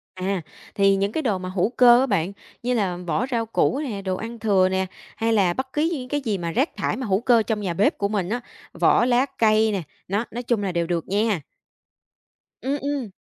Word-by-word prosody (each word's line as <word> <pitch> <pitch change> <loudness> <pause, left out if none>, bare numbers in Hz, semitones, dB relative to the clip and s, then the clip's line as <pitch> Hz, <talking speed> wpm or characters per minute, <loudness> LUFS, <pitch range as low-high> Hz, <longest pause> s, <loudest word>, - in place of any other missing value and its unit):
À, 190 0 -2 0.3
thì 195 -1 +4
những 200 +1 0
cái 315 - -1
đồ 215 -7 +1
mà 185 0 -6
hữu 185 +2 +1
cơ 240 0 +6
á 265 - +3
bạn, 195 -7 0 0.3
như 250 +1 +1
là 195 -7 0
vỏ 170 -1 -1
rau 230 -2 0
củ 230 +4 +1
nè, 235 -10 -4
đồ 190 -1 -2
ăn 230 +3 -7
thừa 195 -4 +3
nè, 190 0 0 0.3
hay 225 0 0
là 190 -5 +3
bất 260 +4 -4
cứ 305 +2 +1
những 260 -5 -5
cái 290 +1 -1
gì 220 -6 -1
mà 170 -2 -3
rác 260 - +1
thải - - -1
hữu 210 -6 0
cơ 235 -2 +4
trong 215 -1 -2
nhà 185 -4 -2
bếp 195 +5 +2
của 200 - 0
mình 200 -3 -2
á, 240 +3 -2 0.3
vỏ - - +3
lá 250 +1 +3
cây 220 0 +4
nè, 195 -3 -1 0.3
đó, 205 +5 -1
nói 240 +2 -5
chung 235 -3 0
là 195 - -1
đều 170 -1 -1
được 170 -2 -2
nha. 205 -2 +1 1.2
Ừm, 275 +2 -1
ừm. 280 -5 -2
215 Hz, 230 wpm, -23 LUFS, 190-245 Hz, 1.2 s, cơ